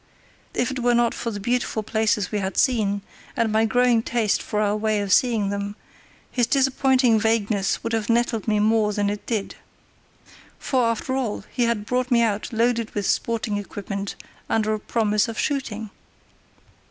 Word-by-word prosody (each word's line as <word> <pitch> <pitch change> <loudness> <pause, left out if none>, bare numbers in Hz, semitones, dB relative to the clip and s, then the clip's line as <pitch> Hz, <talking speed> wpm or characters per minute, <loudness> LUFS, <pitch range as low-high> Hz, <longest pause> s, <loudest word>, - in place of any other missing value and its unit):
If 245 +1 0
it 260 - -4
were 245 0 +2
not 235 -1 +2
for 235 - -3
the 205 -2 -5
beautiful 240 0 -1
places 215 -2 0
we 210 - 0
had 190 0 -3
seen, 205 -6 +2 0.3
and 230 -2 +1
my 220 +1 +3
growing 245 0 +3
taste 225 -2 0
for 210 - -3
our 210 -1 +1
way 215 0 0
of 200 -2 0
seeing 225 -5 +3
them, 200 0 -3 0.6
his 245 -3 +1
disappointing 260 -3 +3
vagueness 210 -3 0
would 230 - -3
have 225 -1 -1
nettled 235 -1 +1
me 210 -1 +2
more 215 0 +2
than 205 0 0
it 205 - -5
did. 215 -4 -2 1.0
For, 255 -3 +1
after 230 +3 -1
all, 250 -7 -2
he 245 - +1
had 230 -3 -1
brought 250 +2 -1
me 235 -2 +4
out 215 -2 -1
loaded 230 0 0
with 205 -1 -1
sporting 225 -1 0
equipment 200 0 -5 0.3
under 215 -1 +1
a 215 - -2
promise 210 -1 +1
of 230 - -6
shooting. 225 -7 -2
220 Hz, 175 wpm, -23 LUFS, 210-240 Hz, 1.0 s, me